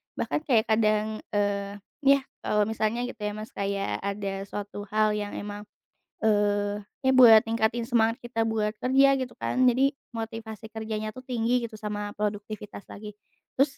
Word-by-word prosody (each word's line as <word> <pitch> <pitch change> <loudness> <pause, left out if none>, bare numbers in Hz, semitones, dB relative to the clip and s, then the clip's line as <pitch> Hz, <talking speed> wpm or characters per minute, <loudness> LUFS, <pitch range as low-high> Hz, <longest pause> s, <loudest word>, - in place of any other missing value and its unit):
Bahkan - - -1
kayak 225 -4 +3
kadang, 215 0 +2 0.2
eee, 200 0 0 0.2
yah 275 -1 +4 0.2
kalau 210 0 +1
misalnya 220 +2 -1
gitu 245 - -6
ya 210 0 -3
Mas 215 +1 -7
kayak 195 - -2
ada 200 -1 -4
suatu 205 0 -6
hal 215 +1 +2
yang 205 0 -5
emang, 205 0 -6 0.6
eee, 205 -1 +2 0.2
ya 265 - +5
buat 225 -4 +8
ningkatin 230 +1 0
semangat 230 0 +2
kita 240 -3 -3
buat 220 -1 0
kerja 275 +2 +5
gitu 260 -2 -3
kan. 255 - -1
Jadi 270 +3 +2 0.2
motivasi 220 -1 -7
kerjanya 215 -1 -4
tuh 255 - -9
tinggi 245 -1 0
gitu 215 - -11
sama 210 -1 -4
produktivitas 210 -1 -5
lagi. 210 0 -8 0.4
Terus 275 +1 +1
215 Hz, 155 wpm, -27 LUFS, 205-235 Hz, 0.6 s, buat